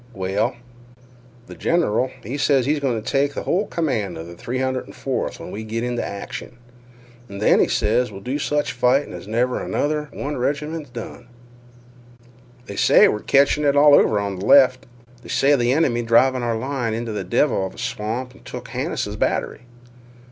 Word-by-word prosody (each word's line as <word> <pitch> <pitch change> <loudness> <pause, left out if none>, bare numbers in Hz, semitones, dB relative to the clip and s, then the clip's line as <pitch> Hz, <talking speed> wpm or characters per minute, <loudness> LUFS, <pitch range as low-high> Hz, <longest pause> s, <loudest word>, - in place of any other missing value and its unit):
"Well—" 95 +4 -1 0.9
"Th' - - -10
general, 130 -7 +1
he 120 +6 -5
ses 135 -3 +2
he 145 - +2
is 150 - -2
goin' 130 -5 -1
t' 110 - -11
take 140 +1 +1
th' - - -3
hull 200 +4 0
command 115 - -2
of 80 - -7
th' 85 0 -12
304th 130 +1 -3
when - - -8
we 110 - -6
go 110 +1 -7
inteh 120 +1 -1
action, 100 +4 -7 0.7
an' 100 - -8
then 105 - +4
he - - +4
ses 115 +3 +1
we'll 95 - -8
do 130 +8 -3
sech 150 0 0
fightin' 130 +1 +1
as 90 +2 -9
never 120 +3 0
another 150 0 -1
one 145 0 -4
reg'ment 150 +2 -3
done." 120 0 -8 1.4
"They 100 - -8
say - - +6
we're 105 - -1
catchin' 140 +4 +3
it 140 -1 +3
over 145 -7 +5
on 100 -2 -3
th' - - -6
left. 130 +2 +5 0.3
They - - -13
say 145 +2 +3
th' 120 -3 0
enemy 130 -5 +2
driv' 115 +3 +4
our 120 -3 -1
line 125 -2 -2
inteh 115 -1 -4
a 100 - -3
devil 95 +3 +1
of - - -13
a - - -17
swamp 125 +1 -4
an' - - -18
took - - -8
Hannises' - - -3
batt'ry." - - -1
125 Hz, 180 wpm, -22 LUFS, 110-140 Hz, 1.4 s, say